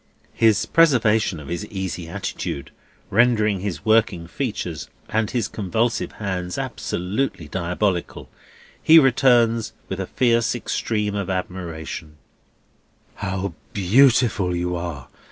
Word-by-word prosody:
His 110 -1 +3
preservation 115 - +3
of 70 - -10
his 85 +4 -3
easy 95 -4 -5
attitude 85 -6 -5 0.4
rendering 110 -3 +3
his 100 0 -5
working 110 -6 +2
features 90 - -4 0.2
and 110 -1 0
his 120 -4 -1
convulsive 110 +4 -1
hands 90 -4 -4
absolutely 90 - -3
diabolical, 90 +2 -2 0.5
he 160 - +7
returns, 120 -5 +4 0.2
with 95 - -4
a 95 - -3
fierce 115 -4 +2
extreme 105 -2 -2
of 100 -2 -3
admiration: 85 -4 -5 1.0
"How 95 -1 -3 0.2
beautiful 110 -2 +3
you 90 0 -1
are! 85 -6 -5
100 Hz, 110 wpm, -22 LUFS, 90-115 Hz, 1.0 s, he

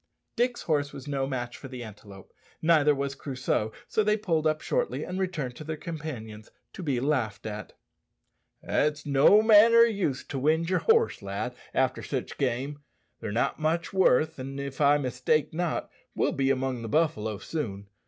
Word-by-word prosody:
Dick's 245 0 0
horse 145 -3 0
was 135 - -10
no 135 -2 -1
match 120 -2 -4
for 135 - -9
the 125 -2 -7
antelope, 100 -3 -12 0.3
neither 155 -3 +4
was 140 0 -2
Crusoe; 130 -5 -2 0.2
so 215 - +1
they 210 +1 +2
pulled 165 -7 0
up 155 0 +1
shortly - - -1
and 180 +1 -4
returned 155 -10 -2
to - - -7
their 155 0 -4
companions, 125 -11 -7 0.2
to - - -8
be 140 -7 0
laughed 120 -8 -1
at. 105 -1 -6 0.9
"It's 150 0 0
no 145 +10 +5
manner 225 +1 +7
o' - - +10
use 200 - 0
to 135 - -3
wind 160 +5 +1
yer 185 - +3
horse, 455 - +3
lad, 100 +5 -4 0.2
after 130 -1 +1
sich 130 -3 -4
game. 135 +2 -1 0.4
They're 110 -2 -5
not 115 +7 0
much 160 +3 -1
worth, 160 -4 +3
an', 135 +1 -6
if 140 0 -5
I 145 0 +5
mistake 130 +3 0
not, 175 0 -2 0.2
we'll - - +1
be 135 -1 0
among 130 -2 0
the 115 - -5
buffalo 110 -9 0
soon. 100 -8 -4
140 Hz, 175 wpm, -27 LUFS, 125-165 Hz, 0.9 s, o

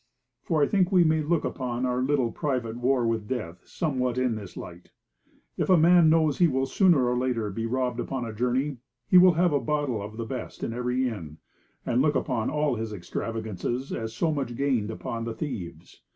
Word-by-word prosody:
For 155 -3 +1
I - - +3
think 190 -2 +2
we 180 -2 +6
may 160 -1 +2
look 155 +1 0
upon 125 -2 -2
our 125 0 0
little 130 -3 +1
private 125 -6 -2
war 125 0 +1
with 115 -2 -1
death 90 -9 -4
somewhat 130 -7 -1
in 130 -2 +1
this 105 -4 -8
light. 90 0 -10 0.7
If - - -1
a 185 - +7
man 170 0 +6
knows 155 -3 +2
he 175 - +6
will 135 -2 0
sooner 155 -4 +3
or 125 - +1
later 125 -4 -1
be 115 +3 -3
robbed 125 0 -1
upon 130 0 -3
a 115 - -6
journey, 125 +5 -1 0.3
he 180 - +7
will 180 0 +7
have 170 0 +2
a 145 - +3
bottle 145 -8 -1
of 105 +2 -8
the 115 - -3
best 125 +2 -6
in 115 - -2
every 125 +2 0
inn, 85 -10 -6 0.5
and 120 +2 +2
look 150 +1 +2
upon 120 -6 0
all 150 -4 0
his 110 0 -4
extravagances 110 +5 -4
as 110 -1 -4
so 160 +5 +1
much 135 -5 -3
gained 125 -6 0
upon 115 +1 -5
the 115 -1 -4
thieves. 90 - -7
125 Hz, 205 wpm, -26 LUFS, 115-150 Hz, 0.7 s, a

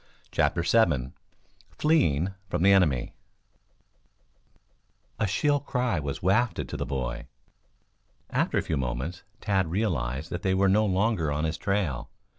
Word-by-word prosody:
CHAPTER 85 - +1
VII 85 - +2 0.7
FLEEING 95 - +2 0.2
FROM 90 -1 -1
THE 100 - +6
ENEMY 75 -11 +2 2.1
A 110 - +1
shrill 145 +9 +2
cry 125 - -1
was 70 +1 -5
wafted 110 +6 +1
to - - -5
the - - -3
boy. 65 -2 -3 1.0
After - - +1
a - - +1
few 80 - -2
moments 65 +7 -3 0.2
Tad 95 -5 +1
realized 80 - -2
that 85 - -3
they 95 -1 +1
were 95 0 +3
no 105 +3 +3
longer 95 -5 +1
on 75 +2 -1
his 80 0 -2
trail. 95 -11 -1
90 Hz, 135 wpm, -27 LUFS, 70-105 Hz, 2.1 s, THE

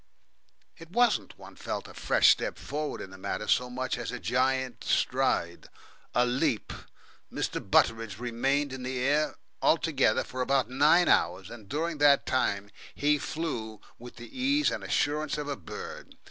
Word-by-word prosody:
It 165 - -12
wasn't, 205 - +1
one - - -13
felt, - - -5
a - - -12
fresh - - +4
step - - -1
forward 150 +1 -4
in 95 - -8
the 95 - -12
matter 105 - -4
so 125 0 +2
much 130 +1 -3
as - - -4
a 125 - -4
giant 130 +1 0
stride, 85 0 0 0.5
a 125 +1 +4
leap. 125 -2 0 0.6
Mr. - - -2
Butteridge 115 -3 +2
remained 135 +4 0
in 130 - -6
the 130 +1 -3
air 145 +4 +1 0.3
altogether - - +2
for 130 - -6
about 130 -1 +1
nine 150 +7 +4
hours, 90 +2 +2
and 110 -4 -11
during 160 +3 -2
that 145 -1 +5
time 100 -5 0 0.2
he 150 0 +2
flew 115 -11 -4 0.2
with 120 +1 -11
the 120 0 -12
ease 280 +3 +2
and - - -4
assurance 150 +1 0
of 150 -1 -4
a 145 - -2
bird. 95 - -9
130 Hz, 160 wpm, -28 LUFS, 115-150 Hz, 0.6 s, that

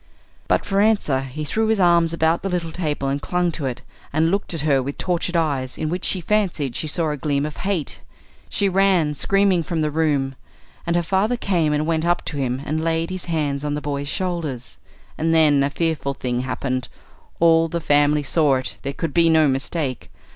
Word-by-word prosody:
But - - +1
for 195 0 +1
answer 205 -11 +2
he 135 +3 -6
threw 220 +9 0
his 220 -1 +1
arms 170 -2 +4
about 165 0 +1
the 195 - -3
little 175 -3 -2
table 150 -5 -2
and 140 +1 -1
clung 180 +1 0
to 150 -4 -3
it, 125 - -5 0.3
and 160 +3 +2
looked 200 +1 -1
at 160 - -3
her 140 -3 +2
with 140 +2 -5
tortured 175 0 -2
eyes, 140 -6 0
in 155 - -2
which 180 +2 -3
she 185 - +1
fancied 175 - 0
she 155 - -2
saw 160 +1 0
a 150 - -3
gleam 140 0 0
of 150 - -6
hate. 190 -7 -2 0.5
She 200 - +1
ran, 190 -5 +3
screaming, 195 +3 +2
from 165 0 -2
the 150 -1 0
room, 145 -4 +1 0.5
and 170 - +1
her 175 - +2
father 200 +7 +1
came 175 -9 +1
and 150 +1 0
went 160 -1 0
up 175 +1 +1
to 150 - -4
him 130 0 -2
and 155 +2 -2
laid 165 +1 0
his 185 -1 -4
hands 150 -4 -1
on 145 0 -1
the - - -2
boy's 145 -1 -3
shoulders. 170 -10 -3 0.4
And 165 +1 +2
then 150 -3 +5
a 140 - +2
fearful 150 -3 -1
thing 125 -2 -2
happened. 130 0 -2 0.5
All 165 0 +5
the 170 +1 -3
family 145 -1 +3
saw 145 0 +2
it. 130 0 -4
There 140 +1 -4
could 160 0 -4
be 165 -1 +4
no 160 -1 +5
mistake. 135 0 -2
160 Hz, 210 wpm, -22 LUFS, 140-175 Hz, 0.5 s, then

